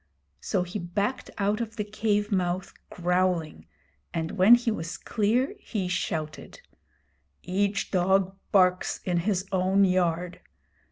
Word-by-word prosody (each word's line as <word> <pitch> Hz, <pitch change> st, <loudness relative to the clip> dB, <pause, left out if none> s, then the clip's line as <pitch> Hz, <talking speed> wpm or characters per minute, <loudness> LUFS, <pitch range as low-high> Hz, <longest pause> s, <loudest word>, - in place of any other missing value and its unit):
So 190 Hz, -3 st, -1 dB
he 180 Hz, +4 st, -5 dB
backed 200 Hz, +8 st, -2 dB
out 205 Hz, +2 st, 0 dB
of 225 Hz, -1 st, -5 dB
the 210 Hz, -, -2 dB
cave 210 Hz, 0 st, -1 dB
mouth 180 Hz, -1 st, -1 dB, 0.2 s
growling, 180 Hz, -2 st, -1 dB, 0.5 s
and 160 Hz, -1 st, -2 dB
when 205 Hz, +4 st, +7 dB
he 240 Hz, -1 st, 0 dB
was 165 Hz, -5 st, -4 dB
clear 235 Hz, -, 0 dB
he 205 Hz, -, -3 dB
shouted: 155 Hz, -4 st, -4 dB, 0.8 s
'Each 195 Hz, +2 st, -1 dB
dog 190 Hz, +1 st, +2 dB, 0.2 s
barks 185 Hz, -2 st, +3 dB
in 180 Hz, -2 st, 0 dB
his 185 Hz, +2 st, 0 dB
own 190 Hz, +1 st, +3 dB
yard! 180 Hz, -1 st, 0 dB
190 Hz, 125 wpm, -27 LUFS, 180-205 Hz, 0.8 s, when